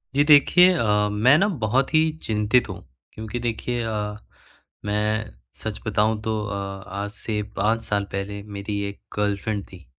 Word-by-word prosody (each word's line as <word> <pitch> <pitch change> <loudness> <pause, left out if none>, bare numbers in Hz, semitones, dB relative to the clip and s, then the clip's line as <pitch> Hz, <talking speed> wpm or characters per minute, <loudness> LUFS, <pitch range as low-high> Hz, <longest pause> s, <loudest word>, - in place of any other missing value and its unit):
जी 145 - +5
देखिए। 160 +5 +7
अ, 105 -8 +2
मैं 120 +8 +5
ना 195 +5 +3 0.2
बहुत 130 +7 +1
ही 160 0 +4
चिंतित 110 +3 +2
हूँ। - - -6 0.3
क्योंकि 110 +2 -5
देखिए 120 +1 -2
अ, 105 -2 -3 0.7
मैं 105 +1 -1 0.2
सच - - -6
बताऊँ 105 +1 +1
तो 110 - -1
अ, 100 - -4 0.4
आज 100 +2 -4
से 105 0 -3 0.2
5 110 +3 +1
साल 100 -2 -1
पहले 100 +1 -4
मेरी 100 0 -5
एक 100 - -11 0.2
गर्लफ्रेंड 105 0 -1
थी। 90 -5 -14
105 Hz, 155 wpm, -24 LUFS, 105-120 Hz, 0.7 s, देखिए